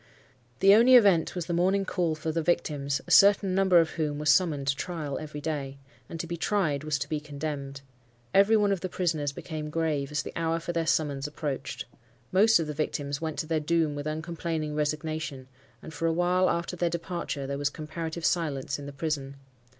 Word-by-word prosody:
The 195 Hz, +1 st, +7 dB
only 240 Hz, +4 st, +7 dB
event 195 Hz, -10 st, +5 dB
was 175 Hz, -3 st, -3 dB
the 175 Hz, -, -3 dB
morning 190 Hz, +3 st, +2 dB
call 175 Hz, -4 st, 0 dB
for 155 Hz, +1 st, -3 dB
the 165 Hz, +1 st, -1 dB
victims, 145 Hz, -4 st, 0 dB
a -, -, -8 dB
certain 200 Hz, -1 st, +6 dB
number 190 Hz, -2 st, +5 dB
of 165 Hz, -1 st, +1 dB
whom 150 Hz, -3 st, -2 dB
were 150 Hz, -, -5 dB
summoned 150 Hz, -1 st, +3 dB
to 140 Hz, -, +2 dB
trial 155 Hz, -3 st, -4 dB
every 150 Hz, -1 st, -7 dB
day. 140 Hz, -3 st, -4 dB, 0.3 s
And 165 Hz, -, -7 dB
to 170 Hz, -, -3 dB
be 170 Hz, +1 st, -5 dB
tried 165 Hz, -6 st, 0 dB
was 155 Hz, -2 st, 0 dB
to 135 Hz, -, -4 dB
be 155 Hz, -, -2 dB
condemned. 140 Hz, -2 st, -6 dB, 0.5 s
Every 200 Hz, +3 st, +5 dB
one 205 Hz, -1 st, +2 dB
of 195 Hz, -, 0 dB
the 185 Hz, -, -3 dB
prisoners 160 Hz, -6 st, -1 dB
became 155 Hz, +1 st, -6 dB
grave, 150 Hz, -3 st, -1 dB
as 150 Hz, 0 st, -1 dB
the -, -, -8 dB
hour 165 Hz, 0 st, 0 dB
for 170 Hz, +1 st, -5 dB
their 165 Hz, -1 st, -1 dB
summons 145 Hz, -3 st, 0 dB
approached. 140 Hz, -4 st, -4 dB, 0.5 s
Most 210 Hz, +2 st, +5 dB
of 165 Hz, -, -1 dB
the 150 Hz, -, -4 dB
victims 145 Hz, -1 st, -3 dB
went 160 Hz, -2 st, -3 dB
to -, -, -2 dB
their 160 Hz, 0 st, 0 dB
doom 160 Hz, 0 st, +1 dB
with 145 Hz, +1 st, -5 dB
uncomplaining 160 Hz, 0 st, -3 dB
resignation, 150 Hz, -2 st, -3 dB, 0.4 s
and 160 Hz, -, -9 dB
for 165 Hz, -, -1 dB
a -, -, +2 dB
while 180 Hz, +2 st, +2 dB
after 170 Hz, +1 st, -2 dB
their 175 Hz, 0 st, 0 dB
departure 170 Hz, -4 st, -4 dB
there 140 Hz, +1 st, -4 dB
was 145 Hz, 0 st, +1 dB
comparative 160 Hz, +2 st, -5 dB
silence 145 Hz, -5 st, -1 dB
in 140 Hz, -, -8 dB
the 140 Hz, -, -8 dB
prison. 140 Hz, -2 st, -3 dB
160 Hz, 205 wpm, -28 LUFS, 145-175 Hz, 0.5 s, The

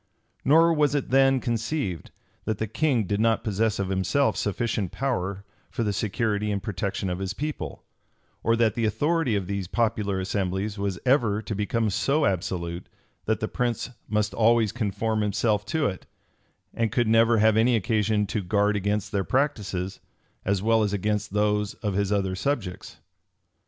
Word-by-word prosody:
Nor 165 Hz, +4 st, +5 dB
was 150 Hz, -2 st, +2 dB
it 140 Hz, -, -2 dB
then 135 Hz, 0 st, +5 dB
conceived, 115 Hz, -, -2 dB, 0.4 s
that 110 Hz, -1 st, -1 dB
the 110 Hz, -, -1 dB
king 125 Hz, +2 st, +1 dB
did 100 Hz, +2 st, -1 dB
not 115 Hz, 0 st, +2 dB
possess 110 Hz, 0 st, 0 dB
of 100 Hz, -1 st, -2 dB
himself 95 Hz, +9 st, +1 dB
sufficient 105 Hz, -2 st, -1 dB
power 100 Hz, -7 st, -2 dB, 0.2 s
for 115 Hz, -, -2 dB
the 105 Hz, -2 st, 0 dB
security 105 Hz, +1 st, -1 dB
and 100 Hz, -1 st, -2 dB
protection 100 Hz, -1 st, -3 dB
of 90 Hz, 0 st, -2 dB
his 95 Hz, 0 st, -3 dB
people, 150 Hz, +4 st, -5 dB, 0.6 s
or 115 Hz, -, +2 dB
that 115 Hz, -2 st, +2 dB
the 115 Hz, 0 st, -1 dB
authority 145 Hz, +2 st, +1 dB
of 100 Hz, -2 st, -1 dB
these 100 Hz, -1 st, -3 dB
popular 105 Hz, -3 st, 0 dB
assemblies 95 Hz, +2 st, -2 dB
was 100 Hz, -2 st, -1 dB
ever 120 Hz, -6 st, +3 dB
to 110 Hz, -, -4 dB
become 105 Hz, +1 st, 0 dB
so 145 Hz, +9 st, +1 dB
absolute, 85 Hz, -2 st, -2 dB, 0.4 s
that 110 Hz, -1 st, 0 dB
the 110 Hz, -, 0 dB
prince 120 Hz, +1 st, -2 dB, 0.2 s
must 105 Hz, 0 st, 0 dB
always 115 Hz, -2 st, +3 dB
conform 110 Hz, -1 st, -1 dB
himself 105 Hz, 0 st, +1 dB
to 160 Hz, -2 st, 0 dB
it, 95 Hz, -2 st, -3 dB, 0.7 s
and 115 Hz, -2 st, 0 dB
could 120 Hz, 0 st, +1 dB
never 115 Hz, +1 st, +4 dB
have 110 Hz, 0 st, +4 dB
any 115 Hz, +2 st, +4 dB
occasion 110 Hz, -1 st, +1 dB
to 105 Hz, +1 st, -2 dB
guard 100 Hz, +3 st, +1 dB
against 105 Hz, +1 st, -1 dB
their 100 Hz, -1 st, 0 dB
practices, 100 Hz, -8 st, -1 dB, 0.4 s
as 100 Hz, 0 st, 0 dB
well 115 Hz, 0 st, +3 dB
as 105 Hz, -1 st, 0 dB
against 105 Hz, +1 st, -1 dB
those 105 Hz, 0 st, 0 dB
of 105 Hz, -3 st, -3 dB
his 100 Hz, +1 st, 0 dB
other 95 Hz, -2 st, +1 dB
subjects. 95 Hz, -4 st, -3 dB
105 Hz, 165 wpm, -26 LUFS, 100-115 Hz, 0.7 s, Nor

